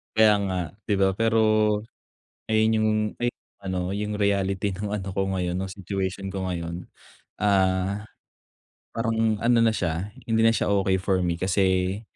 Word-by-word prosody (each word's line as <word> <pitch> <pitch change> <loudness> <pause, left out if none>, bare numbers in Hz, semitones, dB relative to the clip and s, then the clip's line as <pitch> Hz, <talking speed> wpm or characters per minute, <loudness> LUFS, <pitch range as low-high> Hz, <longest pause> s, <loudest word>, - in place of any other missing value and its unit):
Kaya 110 -1 +6
nga, 95 -1 -1 0.3
'di 105 - 0
ba? 95 0 +3
Pero 115 0 +3 1.1
ayun 110 0 +3
yung 110 0 +2 0.3
ayun, 120 0 -1 0.2
ano 95 -1 -3
yung 105 +1 -2
reality 100 -1 0
ng 100 +3 -4
ano 95 -2 -4
ko 95 0 -1
ngayon, 90 -1 -1
ng 95 +2 -3
situation 95 0 -4
ko 95 -1 -3
ngayon. 85 0 -5 0.5
Ah, 95 0 +1 0.9
parang 115 -2 0
ano 120 +2 +3
na 115 - +5
siya, 90 -2 -2 0.2
hindi 110 -1 +1
na 115 - +6
siya 110 -2 +1
okey 95 -1 +2
for 95 0 0
me 85 -1 0
kasi 95 +1 +1
95 Hz, 155 wpm, -25 LUFS, 95-105 Hz, 1.1 s, Kaya